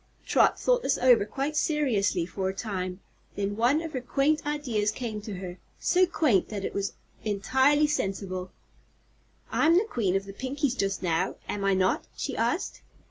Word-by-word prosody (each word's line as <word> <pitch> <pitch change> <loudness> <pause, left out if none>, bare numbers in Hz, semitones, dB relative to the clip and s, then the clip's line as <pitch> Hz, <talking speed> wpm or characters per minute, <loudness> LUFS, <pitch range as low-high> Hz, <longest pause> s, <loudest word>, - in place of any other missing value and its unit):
Trot - - +3
thought - - +2
this - - +1
over 245 -5 +5
quite 275 +7 -3
seriously 230 - +1
for 190 +1 -3
a 190 - -5
time. 185 -3 -4 0.3
Then 200 0 -2
one 250 +8 +2
of 325 - -5
her 255 - -2
quaint 290 +4 +1
ideas 250 -9 0
came 220 -2 -4
to 205 -1 -6
her 180 -1 -7 0.2
so 365 0 +3
quaint 280 - +2
that 200 -2 -4
it - - -4
was 200 0 -2 0.3
entirely 265 +8 +3
sensible. 195 -9 -2 1.0
"I'm 330 +2 +4
the 400 - +3
Queen 205 - 0
of 195 0 0
the 195 - -9
Pinkies 265 +3 -1
just 195 -5 -1
now, 175 +1 0
am 205 - -3
I 195 -1 +3
not?" 185 0 +1
she - - -3
asked. - - -1
215 Hz, 175 wpm, -27 LUFS, 195-285 Hz, 1.0 s, over